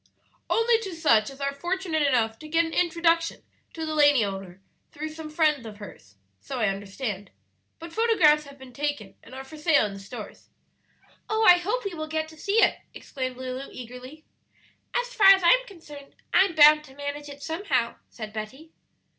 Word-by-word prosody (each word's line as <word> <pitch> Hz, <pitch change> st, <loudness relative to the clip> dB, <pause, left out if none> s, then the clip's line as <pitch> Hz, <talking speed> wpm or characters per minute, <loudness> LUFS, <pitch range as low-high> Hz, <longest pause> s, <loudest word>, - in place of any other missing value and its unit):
"Only 455 Hz, 0 st, +3 dB
to 390 Hz, -6 st, -6 dB
such 230 Hz, -10 st, +3 dB
as 275 Hz, 0 st, -13 dB
are 280 Hz, 0 st, -1 dB
fortunate 345 Hz, +1 st, -2 dB
enough 235 Hz, -6 st, +1 dB
to 310 Hz, -, -10 dB
get 330 Hz, +2 st, +2 dB
an 325 Hz, -, -6 dB
introduction 335 Hz, -1 st, +1 dB, 0.3 s
to 320 Hz, -1 st, -5 dB
the 310 Hz, -, -3 dB
lady 290 Hz, -6 st, +4 dB
owner 195 Hz, -2 st, -7 dB, 0.3 s
through 310 Hz, +2 st, -6 dB
some 310 Hz, 0 st, -9 dB
friend 305 Hz, -4 st, +1 dB
of 210 Hz, -1 st, -10 dB
hers; 105 Hz, -, -13 dB, 0.2 s
so 105 Hz, -, -6 dB
I 215 Hz, -3 st, +2 dB
understand; 200 Hz, 0 st, -5 dB, 0.5 s
but 330 Hz, 0 st, -10 dB
photographs 365 Hz, -10 st, +4 dB
have 280 Hz, 0 st, -13 dB
been 265 Hz, -2 st, -13 dB
taken 285 Hz, -9 st, -3 dB
and 255 Hz, -, -13 dB
are 265 Hz, -, -7 dB
for 270 Hz, +4 st, -12 dB
sale 300 Hz, -5 st, +3 dB
in 205 Hz, -, -5 dB
the 195 Hz, -, -9 dB
stores." 205 Hz, +1 st, -10 dB, 0.8 s
"Oh, 440 Hz, 0 st, +1 dB
I 355 Hz, 0 st, +8 dB
hope 425 Hz, +7 st, -2 dB
we 395 Hz, -, -3 dB
will 310 Hz, -2 st, -5 dB
get 315 Hz, 0 st, -2 dB
to 315 Hz, -, -14 dB
see 405 Hz, +8 st, +2 dB
it!" -, -, +2 dB, 0.2 s
exclaimed 255 Hz, -2 st, -5 dB
Lulu 260 Hz, +1 st, -6 dB
eagerly. 250 Hz, +5 st, -11 dB, 0.7 s
"As -, -, -1 dB
far 420 Hz, -5 st, +5 dB
as 390 Hz, -1 st, +8 dB
I'm -, -, +4 dB
concerned, 295 Hz, -7 st, -13 dB, 0.2 s
I'm 375 Hz, -1 st, +4 dB
bound 300 Hz, 0 st, +7 dB
to 265 Hz, -2 st, -16 dB
manage 285 Hz, +1 st, -6 dB
it 285 Hz, 0 st, -11 dB
somehow," 300 Hz, -, -1 dB
said 215 Hz, -2 st, -9 dB
Betty. 260 Hz, +9 st, -8 dB
295 Hz, 190 wpm, -26 LUFS, 250-335 Hz, 0.8 s, I